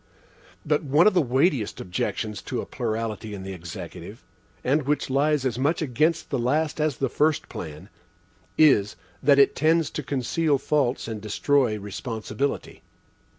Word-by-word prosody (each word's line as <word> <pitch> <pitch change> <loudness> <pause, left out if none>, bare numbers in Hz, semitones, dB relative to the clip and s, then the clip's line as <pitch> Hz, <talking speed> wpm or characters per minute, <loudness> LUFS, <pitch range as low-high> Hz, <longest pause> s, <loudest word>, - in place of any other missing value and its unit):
(But 150 0 +2
one 150 +4 +4
of 215 - +5
the 180 - +4
weightiest 130 - +1
objections 105 +4 -3
to 125 - -2
a - - -4
plurality 110 -3 -3
in 95 - -8
the 95 0 -6
Executive, 85 -2 -9 0.4
and 145 +5 +2
which 145 -2 0
lies 145 +1 +2
as 125 -2 -1
much 145 +5 +1
against 155 +3 0
the 135 - 0
last 150 +6 0
as 150 -4 0
the 135 - 0
first 150 0 +1
plan, 75 -1 -8 0.7
is, 120 -10 +4 0.3
that 140 0 +5
it 140 - +5
tends 160 +1 +2
to - - -3
conceal 140 +3 0
faults 135 -4 0
and 110 -2 -5
destroy 115 +2 +1
responsibility. 110 +5 -4
135 Hz, 150 wpm, -25 LUFS, 110-150 Hz, 0.7 s, of